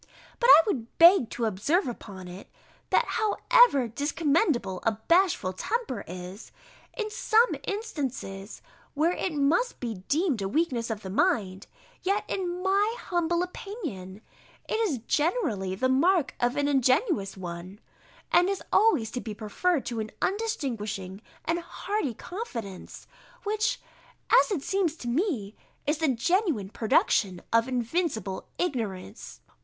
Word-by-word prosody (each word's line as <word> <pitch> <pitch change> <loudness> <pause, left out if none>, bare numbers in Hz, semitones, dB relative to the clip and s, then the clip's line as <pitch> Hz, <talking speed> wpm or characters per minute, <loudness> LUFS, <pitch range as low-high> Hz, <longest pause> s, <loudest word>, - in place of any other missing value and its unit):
But 475 - +3
I - - +10
would 245 - -3
beg 340 - +7
to 235 - -2
observe 225 - +1
upon 195 -6 -8
it, 180 +3 -10 0.4
that - - +3
however 435 - +4
discommendable 285 - 0
a 225 - +1
bashful 335 - +2
temper 330 - -3
is, 180 +3 -8 0.5
in 430 -2 -2
some 460 +1 +3
instances, 270 - -5 0.3
where 315 +4 +2
it 365 - -2
must 310 - +1
be 225 -6 -5
deemed 300 - +1
a 195 - -1
weakness 255 -4 0
of 220 -2 -4
the 190 - -6
mind, 200 - 0 0.3
yet, 395 +2 0
in 360 -1 -3
my 400 +4 +2
humble 345 0 0
opinion, 310 - -7 0.5
it 445 - -1
is 400 - +1
generally 235 - 0
the 260 +7 +1
mark 310 +5 +3
of 245 +1 +1
an 285 -1 +1
ingenuous 260 - +1
one, 180 +2 -7 0.5
and 355 +2 +5
is 395 - -2
always 300 - +4
to 250 - -4
be 215 -2 -6
preferred 265 - -1
to 235 -2 -3
an 215 0 -3
undistinguishing 230 - -3 0.2
and 335 +1 0
hardy 345 - -3
confidence, 235 - -7 0.4
which, 430 +4 0 0.5
as - - +6
it 355 -10 -2
seems 385 -5 0
to 245 - -8
me, 240 - -1 0.3
is 295 +1 0
the 320 - +2
genuine 275 - +1
production 200 -4 +2
of 230 +1 +4
invincible 245 - -2
ignorance. 205 - -4
280 Hz, 135 wpm, -27 LUFS, -, 0.5 s, I